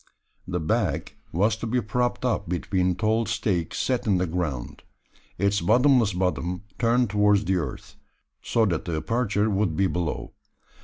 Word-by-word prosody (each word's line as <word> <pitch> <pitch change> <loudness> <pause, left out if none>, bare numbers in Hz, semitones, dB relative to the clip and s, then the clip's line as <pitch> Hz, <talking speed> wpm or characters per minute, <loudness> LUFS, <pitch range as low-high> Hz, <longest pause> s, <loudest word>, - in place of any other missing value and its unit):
The 90 -1 -2
bag 85 -3 -1 0.2
was 105 +6 +2
to 115 - -4
be 125 +3 +1
propped 120 +3 -1
up 105 -7 -1
between 90 0 0
tall 110 +3 +1
stakes 95 -6 -1
set 125 -3 -1
in 100 -3 +3
the 90 - +1
ground; 80 -8 -3 0.6
its 100 +2 +1
bottomless 120 +2 +4
bottom 90 0 -1 0.2
turned 120 -1 +2
towards 105 -1 +3
the 95 0 +1
earth, 75 -7 -6 0.4
so 115 -1 +2
that 85 -6 -1
the 85 - -2
aperture 110 +2 0
would 95 -5 0
be 100 - +3
below. 90 -3 -2
100 Hz, 155 wpm, -25 LUFS, 90-115 Hz, 0.6 s, bottomless